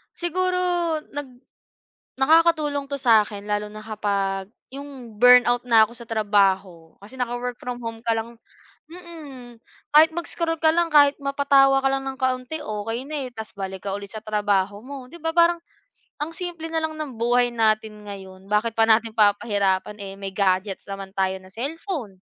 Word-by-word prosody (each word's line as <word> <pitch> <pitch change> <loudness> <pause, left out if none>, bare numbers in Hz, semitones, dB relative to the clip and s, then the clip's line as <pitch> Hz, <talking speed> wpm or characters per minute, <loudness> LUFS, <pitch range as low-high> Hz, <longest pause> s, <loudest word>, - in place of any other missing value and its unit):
Siguro 365 +1 -1 0.5
nag 290 -1 -5 0.9
nakakatulong 310 -1 +3
'to 280 0 -3
sa 225 -5 +5
'kin, 205 -1 -9
lalo 210 0 -1
na 215 0 -10
kapag 200 -3 -2 0.3
yung 270 -6 -10
burnout 245 +1 +6
na 225 -3 +6
ako 225 - -14
sa 235 - -9
trabaho, 195 -6 +1
kasi 215 +6 -13
naka-work 245 0 -3
from 245 -1 -5
home 230 -1 -6
ka 230 - +2
lang 230 +1 -5 0.5
mm. 310 -8 -10 0.4
Kahit 310 +2 +7
mag-scroll 330 -1 -3
ka 315 -1 +4
lang, 340 +1 +2
kahit 285 -1 +6
mapatawa 275 -1 +4
ka 270 - +2
lang 270 0 -1
ng 265 - -5
kaunti, 260 +4 -1
okey 225 +4 -4
na, 290 -4 -3
eh, - - -15
tas 220 -1 -7
balik 190 -1 -6
ka 195 - -2
ulit 200 -1 -9
sa 220 - -6
trabaho 205 -1 0
mo. 270 -1 -8
Di 340 - -12
ba 325 +1 -2
parang, 340 +1 +4 0.7
ang 315 +2 -3
simple 345 -3 -5
na 325 - +1
lang 315 0 -2
ng 280 -7 -6
buhay 245 +1 +2
natin 215 -2 0
ngayon, 190 -1 -10
bakit 210 +2 +1
pa 225 - +5
natin 225 0 +4
papahirapan, 205 -2 +1
eh, 195 -1 -6
may 195 -1 -6
gadgets 190 0 0
naman 195 -1 -7
tayo 190 0 +1
na 185 - -16
cellphone? 270 - -5
235 Hz, 170 wpm, -23 LUFS, 205-285 Hz, 0.9 s, Kahit